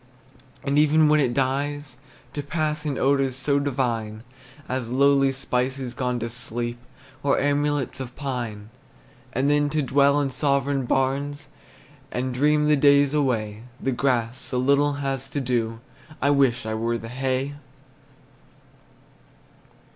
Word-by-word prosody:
And 140 Hz, +1 st, +2 dB
even 155 Hz, +1 st, +4 dB
when 155 Hz, 0 st, +4 dB
it 130 Hz, -4 st, +2 dB
dies, 135 Hz, +1 st, -2 dB, 0.4 s
to 145 Hz, -, -3 dB
pass 150 Hz, 0 st, -2 dB
In 140 Hz, -3 st, -2 dB
odors 135 Hz, -1 st, +2 dB
so 140 Hz, +2 st, +1 dB
divine, 115 Hz, -6 st, -2 dB, 0.4 s
As 125 Hz, -2 st, -3 dB
lowly 135 Hz, +1 st, +4 dB
spices 130 Hz, -1 st, -2 dB
gone 125 Hz, -1 st, -1 dB
to 115 Hz, -, -2 dB
sleep, 120 Hz, 0 st, -3 dB, 0.4 s
Or 140 Hz, -1 st, +2 dB
amulets 145 Hz, -2 st, 0 dB
of 130 Hz, -1 st, -7 dB
pine. 120 Hz, -6 st, -5 dB, 0.6 s
And 130 Hz, +2 st, 0 dB
then 145 Hz, 0 st, +3 dB
to 155 Hz, 0 st, 0 dB
dwell 140 Hz, +2 st, +3 dB
in 140 Hz, -2 st, -1 dB
sovereign 140 Hz, 0 st, +1 dB
barns, 135 Hz, +3 st, -1 dB, 0.6 s
And 130 Hz, +1 st, -2 dB
dream 150 Hz, +3 st, +2 dB
the 150 Hz, -, +5 dB
days 140 Hz, 0 st, +4 dB
away, 110 Hz, -8 st, 0 dB, 0.2 s
The 135 Hz, -, -1 dB
grass 120 Hz, -2 st, 0 dB
so 125 Hz, -, -3 dB
little 140 Hz, +3 st, +3 dB
has 135 Hz, -2 st, -3 dB
to 145 Hz, -, -2 dB
do, 115 Hz, -3 st, -1 dB, 0.4 s
I 140 Hz, -, +2 dB
wish 130 Hz, -4 st, +2 dB
I 110 Hz, -, -2 dB
were 115 Hz, +2 st, -1 dB
the 115 Hz, -, -8 dB
hay! 130 Hz, +2 st, -1 dB
135 Hz, 140 wpm, -24 LUFS, 125-145 Hz, 0.6 s, the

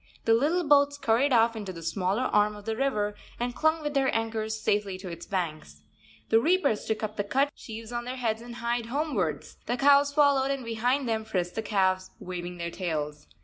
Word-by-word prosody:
The 225 Hz, -, +5 dB
little 305 Hz, +10 st, +2 dB
boats 285 Hz, 0 st, +5 dB
scurried 270 Hz, +1 st, +2 dB
off 230 Hz, -1 st, +4 dB
into 205 Hz, -4 st, -5 dB
the 165 Hz, -2 st, -9 dB
smaller 195 Hz, +7 st, 0 dB
arm 210 Hz, -3 st, +2 dB
of 205 Hz, 0 st, -12 dB
the 225 Hz, -1 st, -1 dB
river 215 Hz, -5 st, 0 dB, 0.3 s
and 245 Hz, +1 st, -1 dB
clung 315 Hz, +3 st, +1 dB
with 295 Hz, 0 st, -2 dB
their 270 Hz, -2 st, +2 dB
anchors 220 Hz, -1 st, -2 dB
safely 205 Hz, -3 st, 0 dB
to 185 Hz, -1 st, -8 dB
its 170 Hz, -1 st, -8 dB
banks. 155 Hz, -, -4 dB, 0.5 s
The 225 Hz, -, +5 dB
reapers 300 Hz, -, +2 dB
took 220 Hz, 0 st, -2 dB
up 215 Hz, 0 st, -4 dB
the 205 Hz, -, 0 dB
cut 270 Hz, +7 st, +1 dB
sheaves 225 Hz, 0 st, -9 dB
on 240 Hz, 0 st, -3 dB
their 250 Hz, +1 st, -4 dB
heads 225 Hz, -3 st, -1 dB
and 235 Hz, 0 st, -9 dB
hied 235 Hz, 0 st, -2 dB
homewards; 230 Hz, -, -2 dB
the 245 Hz, -, 0 dB
cows 280 Hz, +1 st, +5 dB
followed, 280 Hz, -2 st, +3 dB
and 275 Hz, -3 st, -2 dB
behind 245 Hz, +4 st, 0 dB
them 220 Hz, -1 st, 0 dB
frisked 180 Hz, -5 st, -2 dB
the 220 Hz, -, -2 dB
calves 190 Hz, -3 st, +1 dB
waving 180 Hz, -1 st, -6 dB
their 170 Hz, 0 st, -4 dB
tails. 150 Hz, -5 st, -4 dB
225 Hz, 205 wpm, -28 LUFS, 195-265 Hz, 0.5 s, The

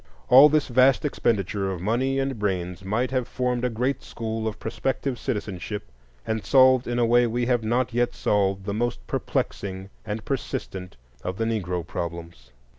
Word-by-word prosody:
All 135 Hz, +4 st, +9 dB
this 155 Hz, 0 st, +2 dB
vast 130 Hz, +2 st, +4 dB
expenditure 100 Hz, -7 st, 0 dB
of 90 Hz, -, -4 dB
money 120 Hz, +8 st, 0 dB
and 135 Hz, -3 st, -1 dB
brains 90 Hz, -3 st, -2 dB
might 110 Hz, +7 st, -1 dB
have 130 Hz, -2 st, 0 dB
formed 125 Hz, -1 st, -1 dB
a 125 Hz, -, +2 dB
great 125 Hz, +4 st, -1 dB
school 110 Hz, -1 st, -4 dB
of 110 Hz, -, -4 dB
prospective 130 Hz, +2 st, -2 dB
citizenship, 105 Hz, -, -4 dB, 0.3 s
and 110 Hz, -1 st, -2 dB
solved 130 Hz, -2 st, +5 dB
in 120 Hz, 0 st, -1 dB
a 120 Hz, -, +3 dB
way 120 Hz, +1 st, +4 dB
we 120 Hz, +1 st, -1 dB
have 120 Hz, -2 st, +1 dB
not 120 Hz, +2 st, 0 dB
yet 120 Hz, 0 st, +1 dB
solved 100 Hz, -2 st, +1 dB
the 100 Hz, -, -2 dB
most 110 Hz, -, -2 dB
perplexing 95 Hz, +7 st, -3 dB
and 105 Hz, +1 st, -5 dB
persistent 95 Hz, -, -4 dB, 0.3 s
of 90 Hz, +1 st, -4 dB
the 115 Hz, -, 0 dB
Negro 90 Hz, -6 st, -2 dB
problems. 85 Hz, -7 st, -6 dB
115 Hz, 170 wpm, -25 LUFS, 95-125 Hz, 0.3 s, All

